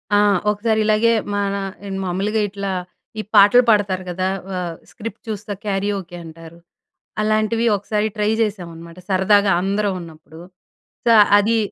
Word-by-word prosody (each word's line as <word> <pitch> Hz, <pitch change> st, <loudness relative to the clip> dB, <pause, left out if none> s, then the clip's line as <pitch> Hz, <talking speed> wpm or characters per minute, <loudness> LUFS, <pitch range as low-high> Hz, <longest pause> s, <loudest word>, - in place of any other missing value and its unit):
ఆ! -, -, +5 dB, 0.3 s
ఒకసారి 220 Hz, +1 st, 0 dB
ఇలాగే 215 Hz, +2 st, +3 dB, 0.2 s
మన 200 Hz, -1 st, -1 dB, 0.4 s
ఆహ్, 195 Hz, -, -4 dB
మామూలుగా 200 Hz, +4 st, -1 dB
ఇట్లా 200 Hz, 0 st, -4 dB, 0.5 s
ఈ -, -, 0 dB
పాటలు 205 Hz, +5 st, +7 dB
పాడతారు 200 Hz, -4 st, +2 dB
కదా, 185 Hz, +1 st, -2 dB, 0.3 s
ఆహ్, 175 Hz, -2 st, -4 dB, 0.2 s
స్క్రిప్ట్ 225 Hz, 0 st, -8 dB
చూస్తే 210 Hz, -1 st, -5 dB
క్యారియోకే 195 Hz, -3 st, -3 dB
అంటారు. 165 Hz, +1 st, -12 dB, 0.6 s
అలాంటివి 215 Hz, +2 st, +1 dB
ఒకసారి 210 Hz, +2 st, -1 dB
ట్రై 210 Hz, 0 st, +1 dB
చేశాం 205 Hz, -5 st, -2 dB
అనమాట 170 Hz, +1 st, -12 dB
సరదాగా 195 Hz, +1 st, +3 dB
అందరం 200 Hz, +1 st, 0 dB
ఉన్నప్పుడు. 160 Hz, -1 st, -13 dB, 0.7 s
సో, 235 Hz, -, +4 dB, 0.3 s
అది 225 Hz, +3 st, +1 dB
200 Hz, 135 wpm, -20 LUFS, 185-215 Hz, 0.7 s, పాటలు